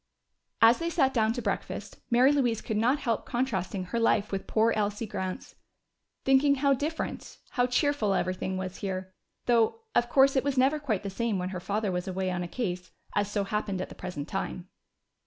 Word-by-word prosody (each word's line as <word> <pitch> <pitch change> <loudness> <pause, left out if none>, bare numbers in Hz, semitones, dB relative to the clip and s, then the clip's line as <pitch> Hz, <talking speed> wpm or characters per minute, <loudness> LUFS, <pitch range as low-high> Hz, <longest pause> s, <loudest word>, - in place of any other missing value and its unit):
As 230 +2 +7
they 335 0 -1
sat 275 -6 +2
down 220 -2 +3
to 245 - -4
breakfast - - -4
Mary 250 +3 +5
Louise 245 -6 +2
could 220 - -4
not 240 +6 +3
help 235 -6 -1
contrasting 200 -7 -2
her 230 +6 -2
life 215 -2 +2
with 195 -1 -3
poor 225 +1 +3
Elsie 210 +1 -1
Grant's. 190 -3 -5 0.7
Thinking 270 +1 +5
how 280 0 +3
different, 300 +5 -4
how 245 -2 +2
cheerful 250 -6 +1
everything 185 +1 -1
was 185 -1 -4
here 185 -1 -4 0.3
though 240 - +3
of 240 - +2
course 270 +2 +5
it 265 - +3
was 280 -1 -1
never 270 +4 +3
quite 225 -10 -1
the 200 - -4
same 230 0 -1
when 180 0 -2
her 185 -1 -4
father 205 +2 -1
was 180 +1 -3
away 185 0 -1
on 180 0 -2
a 175 - -3
case, 180 -4 -3 0.3
as 205 0 +1
so 205 -1 0
happened 200 -1 -2
at 185 - -4
the - - -9
present 170 -5 -6
time. 185 -1 -4
220 Hz, 195 wpm, -28 LUFS, 190-260 Hz, 0.7 s, As